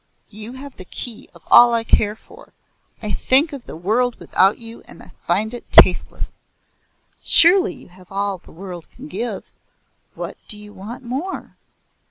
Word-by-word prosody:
You 215 +3 -9
have 270 +1 -11
the 185 - -10
key 230 +4 -6
of 170 - -17
all 240 -1 +8
I 230 - 0
care 210 -2 +2
for. - - -18 0.5
I 210 - -3
think 275 - +3
of 270 -4 -9
the - - -8
world 225 +9 0
without 195 +2 +2
you 230 0 -12
and - - -15 0.2
find 210 +6 0
it 240 - -10
tasteless." 180 - +4 0.8
"Surely 370 +4 +5
you - - -15
have 180 +1 -19
all 200 -1 -2
the - - -18
world 180 -1 -9
can 270 +4 -12
give? 235 -8 -5 0.6
What - - -7
do 210 - -3
you 210 0 -12
want 210 +6 -9
more?" 270 +10 -5
220 Hz, 165 wpm, -20 LUFS, 195-250 Hz, 0.8 s, all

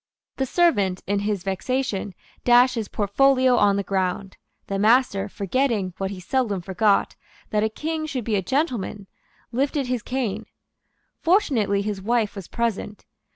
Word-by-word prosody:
The 265 - -1
servant, 205 - +2
in 200 +1 0
his 205 -2 -2
vexation, 200 0 -2 0.3
dashed 245 +1 +5
his 225 -4 -3
portfolio 255 +5 +3
on 200 -4 +4
the 200 - -1
ground. 190 0 -2 0.3
The 195 0 -3
master, 215 -2 +3
forgetting, 205 -1 -1
what 195 0 -1
he 195 -2 -7
seldom 215 0 -1
forgot, 195 +3 +1 0.4
that 210 0 +1
a 220 - +1
King 310 +6 -3
should 260 -5 -3
be 215 -1 -1
a 195 - +1
gentleman, 240 - -2 0.5
lifted 275 +3 0
his 250 -2 -2
cane. 250 -3 -3 0.7
Fortunately 260 - +2
his 205 -2 -3
wife 225 0 0
was 195 -4 -7
present. 225 -3 -3
215 Hz, 150 wpm, -23 LUFS, 195-255 Hz, 0.7 s, dashed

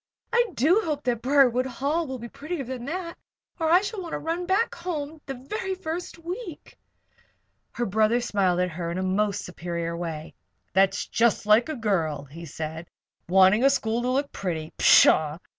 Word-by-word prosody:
"I 475 0 +4
do 335 - +4
hope 300 -2 -3
that 240 -2 -1
Briarwood 255 -1 +3
Hall 285 +6 -1
will 260 -1 -5
be 235 0 -8
prettier 295 +5 -5
than 250 -1 -6
that, 335 +3 -5 0.4
or 320 -1 +1
I 355 +3 +6
shall 410 0 -4
want 340 -3 -7
to - - -1
run 340 +2 -3
back 400 +5 +1
home 320 -3 -5
the 270 - -4
very 380 - -4
first 350 -1 -5
week." 350 +1 -8 1.0
Her 240 - -2
brother 220 +3 +2
smiled 195 -7 +1
in 175 -1 -3
a 185 - -1
most 200 +2 0
superior 170 -1 -4
way. 165 -2 -5 0.4
"That's 195 0 +2
just 230 -2 +1
like 215 +6 +4
a 310 - -2
girl," 170 - -1
he 165 +5 -10
said. 160 +3 -6 0.4
"Wanting 190 +5 +5
a 275 - +7
school 230 -3 0
to 250 - -1
look 275 +2 0
pretty! 160 -4 -4
Pshaw! 155 0 +5
245 Hz, 175 wpm, -25 LUFS, -, 1.0 s, a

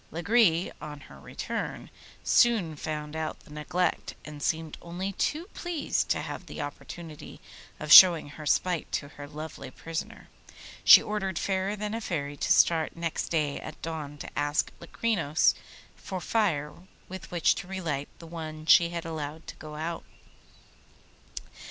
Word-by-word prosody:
Lagree, 175 0 +3
on 150 -1 -8
her - - -14
return, - - -5 0.3
soon 215 -10 +3
found 150 0 -5
out 160 -1 -4
the 150 - -15
neglect, 155 +4 -1
and 150 -1 -9
seemed 160 +1 -1
only 180 +3 -4
too 305 - -1
pleased 350 -4 -2
to - - +1
have - - -7
the - - -8
opportunity 165 -4 -8 0.4
of 150 0 -4
showing 170 -4 +10
her 150 +1 -8
spite 180 +2 +1
to 140 - -2
her 145 0 -10
lovely 150 -2 -8
prisoner. 165 +4 -6 0.6
She - - +10
ordered 195 -4 -2
Fairer 190 +2 -1
than 210 0 -4
a 225 - -3
Fairy 145 -8 -3
to - - -2
start 160 -2 +4
next 170 -1 -2
day 150 -4 0
at 155 - -9
dawn 155 -3 -5
to - - -7
ask 145 0 0
Locrinos 170 -4 +1 0.4
for 190 - -6
fire 160 -7 0 0.3
with 190 0 -8
which 175 -2 +3
to - - -7
relight 165 -7 -3
the 170 - -12
one 155 -2 -7
she 170 +1 +6
had 170 0 -5
allowed 160 -1 -5
to - - -9
go 150 -1 -9
out. 165 +2 -4
165 Hz, 150 wpm, -28 LUFS, 150-185 Hz, 0.6 s, showing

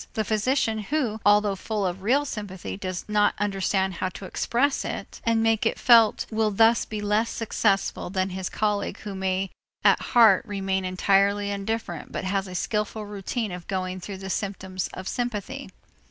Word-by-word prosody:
The 220 - +1
physician 220 +1 +1
who, 220 -1 -1
although 205 -1 +4
full 205 +1 -2
of 180 +1 -3
real 265 +8 +2
sympathy, 205 -8 -5
does 185 -2 -5
not 210 -1 +2
understand 195 -1 0
how 185 +1 -2
to 190 - -9
express 270 +8 0
it - - -6
and 225 -1 +2
make 225 -1 +2
it 225 - +1
felt 230 -3 +5
will 220 0 +2
thus 225 +3 +4
be 215 -1 -5
less 210 +2 +1
successful 205 -5 0
than 190 0 -1
his 185 0 -4
colleague 210 -1 -1
who 205 -2 -6
may 190 0 -1 0.3
at - - +5
heart 225 -6 +5
remain 195 -2 -2
entirely 200 +2 +2
indifferent 200 -4 -4
but - - -4
has 195 +1 -1
a 180 - -8
skillful 210 +2 -2
routine 205 +2 -3
of 180 -1 -8
going 185 -1 -2
through 195 +2 -7
the 190 0 -6
symptoms 190 -2 -3
of 185 - -7
sympathy. 240 -5 -3
205 Hz, 170 wpm, -25 LUFS, 190-220 Hz, 0.3 s, felt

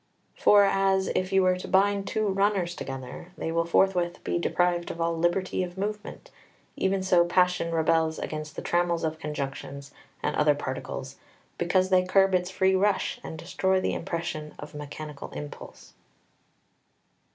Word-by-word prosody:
2 - - -20
For 205 -1 +7
as, 195 -1 +2
if 185 +1 0
you 190 -1 +4
were 185 0 +3
to 185 - -7
bind 200 +1 +2
two 215 -1 0
runners 195 -2 +1
together, 135 +4 -7
they 160 - -3
will 170 0 +1
forthwith 175 0 +1
be - - -1
deprived 175 0 +1
of 170 - -6
all 165 0 0
liberty 175 +3 0
of 180 0 -5
movement, 210 +2 -5 0.4
even 190 0 0
so 180 -2 +5
passion 180 -1 +2
rebels 160 -1 +2
against 155 0 -5
the - - -6
trammels 175 -1 +1
of 160 0 -2
conjunctions 140 -2 -5 0.3
and - - 0
other - - +4
particles, - - -5 0.4
because 185 +2 +2
they 185 -1 +5
curb 195 +1 +3
its 180 0 +1
free 190 0 +2
rush 195 +1 +1
and 160 - -7
destroy 190 +3 0
the - - -1
impression 165 -3 -4
of 150 - -9
mechanical 150 0 -7
impulse. 75 0 -9
175 Hz, 160 wpm, -27 LUFS, 165-190 Hz, 0.4 s, For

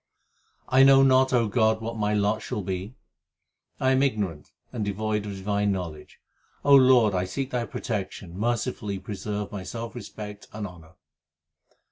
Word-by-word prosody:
I 130 +1 +5
know 135 0 +7
not, 130 0 +4
O 120 -3 +3
God, 110 +1 +2
what 115 +1 -5
my 105 -1 0
lot 105 +1 +1
shall 105 - -4
be. 95 +5 -4 0.8
I 130 - +2
am 130 0 +3
ignorant 105 - -1 0.2
and 115 -4 -2
devoid 105 +1 -2
of 100 - -4
divine 100 +1 0
knowledge; 85 -6 -6 0.5
O 140 - +6
Lord, 130 -6 +6
I 90 0 0
seek 135 +8 -4
Thy 120 -2 -1
protection, 95 -6 -5
mercifully 110 -1 -2
preserve 105 +1 -5
my 100 - -5
self 115 +5 -6
respect 105 -3 -8
and 105 -1 -4
honour. 85 -4 -12
105 Hz, 155 wpm, -26 LUFS, 100-120 Hz, 0.8 s, know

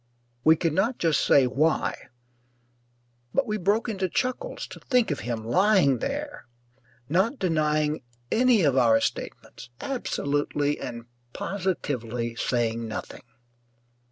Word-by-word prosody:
We 160 +1 +6
could 165 -1 -1
not 220 +9 +1
just 165 -3 +2
say 140 -2 +5
why, 145 +2 0 1.3
but 275 - +3
we 215 -2 -2
broke 205 +5 +1
into 195 -4 -2
chuckles 260 - -2
to - - -10
think 250 - +1
of 145 - -2
him 115 -2 -4
lying 180 - +3
there, 290 +1 -4 0.6
not 190 - +1
denying 155 -4 +1 0.3
any 240 -4 +4
of 140 -4 +3
our 115 -4 +5
statements, - - -5
absolutely 145 - -1
and 115 -1 -6 0.3
positively 125 - -3
saying 115 -1 -1
nothing. 110 -3 -6
155 Hz, 120 wpm, -26 LUFS, 130-215 Hz, 1.3 s, We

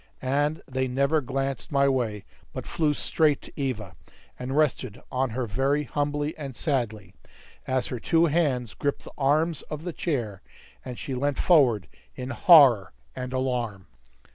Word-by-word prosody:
And 145 +4 0
they 130 0 -1
never 140 +5 +1
glanced 135 +1 -3
my 140 -1 +3
way, 115 -7 -1 0.3
but - - -6
flew 150 -3 0
straight 150 -1 +2
to - - -12
Eva, 120 - -3 0.4
and 130 +3 -3
rested 130 -7 0
on 130 0 0
her 125 +2 -2
very 135 +7 0
humbly 145 +2 -2
and 135 -4 -6
sadly, 115 - -2 0.5
as 130 -2 0
her 125 - -4
two 165 +7 +3
hands 140 -8 0
gripped 140 -1 -2
the - - -11
arms 150 +3 +1
of 150 0 -5
the 175 -1 -4
chair, 120 - -3 0.4
and 125 -2 -7
she 135 - -5
leant 140 +2 -1
forward 125 - +4 0.3
in 125 +2 -5
horror 130 - +6 0.2
and 125 0 -5
alarm. 125 -7 -2
135 Hz, 155 wpm, -26 LUFS, 125-145 Hz, 0.5 s, horror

